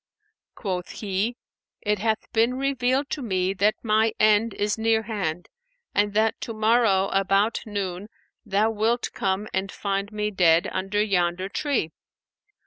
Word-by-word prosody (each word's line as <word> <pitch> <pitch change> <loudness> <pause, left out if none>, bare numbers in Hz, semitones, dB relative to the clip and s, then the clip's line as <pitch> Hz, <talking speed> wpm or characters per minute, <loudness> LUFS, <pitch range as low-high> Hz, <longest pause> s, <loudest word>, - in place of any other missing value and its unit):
Quoth 185 -4 -4
he, 210 +4 -1 0.5
'It 210 -2 0
hath 220 +1 0
been 230 +3 +2
revealed 270 0 0
to 295 - -2
me 190 -5 0
that 205 +2 +2
my 220 0 +2
end 215 +1 +4
is 205 0 0
nearhand 220 -7 -1 0.5
and 205 0 +1
that 220 +1 +1
to 230 - -5
morrow 215 -3 +3
about 195 +3 +2
noon 200 -2 -4 0.4
thou 210 0 +1
wilt 225 +3 0
come 195 +2 -1
and 190 +1 -1
find 200 0 -3
me 210 0 -2
dead 170 -4 +4
under 195 +2 -2
yonder 185 -2 0
tree. 235 - -1
210 Hz, 135 wpm, -25 LUFS, 195-225 Hz, 0.5 s, end